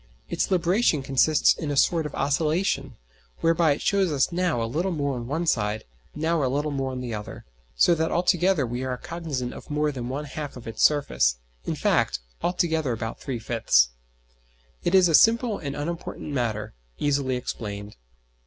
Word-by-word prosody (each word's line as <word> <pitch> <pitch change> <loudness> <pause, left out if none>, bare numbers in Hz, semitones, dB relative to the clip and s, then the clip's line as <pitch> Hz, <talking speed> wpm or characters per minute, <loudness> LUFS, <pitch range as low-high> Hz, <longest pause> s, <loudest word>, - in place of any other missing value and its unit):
Its - - -1
libration 180 - +2
consists 135 +3 +4
in 155 - -5
a 145 - -1
sort 165 +2 +3
of 150 - -9
oscillation, 145 -2 0 0.5
whereby 165 -2 +3
it - - -6
shows 195 -4 +2
us 140 +1 +1
now 175 -6 0
a 115 - 0
little 165 +11 -1
more 140 -4 -1
on 120 -2 -5
one 160 +6 -1
side, 105 -7 0 0.3
now 160 0 0
a 130 - +1
little 145 +3 -1
more 135 -1 -2
on 130 -1 -5
the 120 -2 -4
other, 105 -1 -7 0.3
so 115 - +5
that 160 0 0
altogether 175 -2 +2
we 120 +2 -4
are 130 -1 -2
cognizant 145 -6 -4
of - - -11
more 150 0 +1
than 125 -3 -5
one 140 +3 -3
half 145 -1 -6
of 120 - -11
its 115 - -5
surface - - +3 0.3
in - - -2
fact, - - +1 0.2
altogether 160 -6 0
of - - -4
about 110 - -4
three 130 -3 -4
fifths. 110 - +3 0.9
It 185 - +2
is 185 -2 +7
a 165 - 0
simple 230 +4 +4
and 140 -2 -5
unimportant 165 0 -5
matter, 115 -5 -2 0.2
easily 140 -3 0
explained. 105 -4 -5
145 Hz, 180 wpm, -25 LUFS, 125-165 Hz, 0.9 s, is